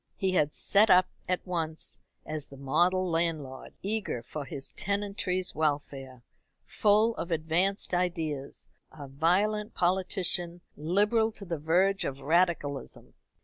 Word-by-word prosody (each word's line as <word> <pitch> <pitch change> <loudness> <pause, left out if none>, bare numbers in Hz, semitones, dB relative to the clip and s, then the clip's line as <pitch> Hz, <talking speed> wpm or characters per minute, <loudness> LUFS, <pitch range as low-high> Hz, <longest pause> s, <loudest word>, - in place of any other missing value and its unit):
He 190 -1 0
had 150 -5 +1
set 210 +2 +4
up 185 0 +6 0.2
at 180 0 -1
once 165 -3 -3 0.3
as 155 -2 -4
the 140 - -13
model 175 +7 +1
landlord, 165 -6 -2
eager 200 - -2
for 145 +4 -6
his 135 +1 -4
tenantry's 200 -2 -1
welfare, 140 -4 -3 0.4
full 215 - +3
of 170 - -4
advanced 170 +5 0
ideas, 165 -6 -2 0.3
a 145 -3 -10
violent 190 +9 0
politician, 180 -1 +1
liberal 210 +8 +2
to 200 - -8
the 170 -4 -4
verge 185 +6 +2
of 135 0 -4
radicalism. 155 -2 -1
175 Hz, 125 wpm, -29 LUFS, 150-190 Hz, 0.4 s, up